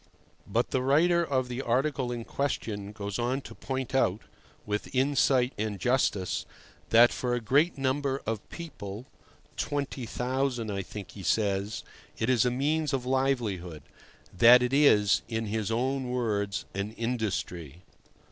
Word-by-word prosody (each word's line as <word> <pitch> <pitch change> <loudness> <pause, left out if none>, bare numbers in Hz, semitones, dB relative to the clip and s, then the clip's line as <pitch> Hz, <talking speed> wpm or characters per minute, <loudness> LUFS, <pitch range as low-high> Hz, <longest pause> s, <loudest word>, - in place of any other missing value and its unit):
But - - 0
the 130 - +1
writer 170 +6 +3
of 130 -5 0
the 125 +1 -4
article 130 +1 0
in 120 -1 -4
question 105 -7 -3
goes 100 -1 -5
on 125 +3 0
to - - -10
point 130 -1 -4
out, 105 -6 +2 0.4
with 105 +4 -3
insight 130 -1 +3
and 105 -1 -2
justice, 110 -5 0 0.4
that 120 +2 +7
for 125 -1 -1
a - - -1
great 140 +9 +2
number 135 0 0
of 110 -1 -4
people 115 - -7 0.5
(20,000, 130 -3 -2
I 100 -1 -2
think 100 +1 -8
he 100 - -10
says) 100 +1 0 0.3
it 110 +3 +1
is 125 -2 +3
a - - +3
means 145 +4 0
of 130 -2 -1
livelihood—that 120 - +2
it 125 +2 -1
is, 105 -8 +5
in 115 -1 -2
his 110 0 -2
own 130 +3 -1
words, 105 -5 -1
an 100 +2 -3
industry. 95 - -3
120 Hz, 140 wpm, -28 LUFS, 105-135 Hz, 0.5 s, that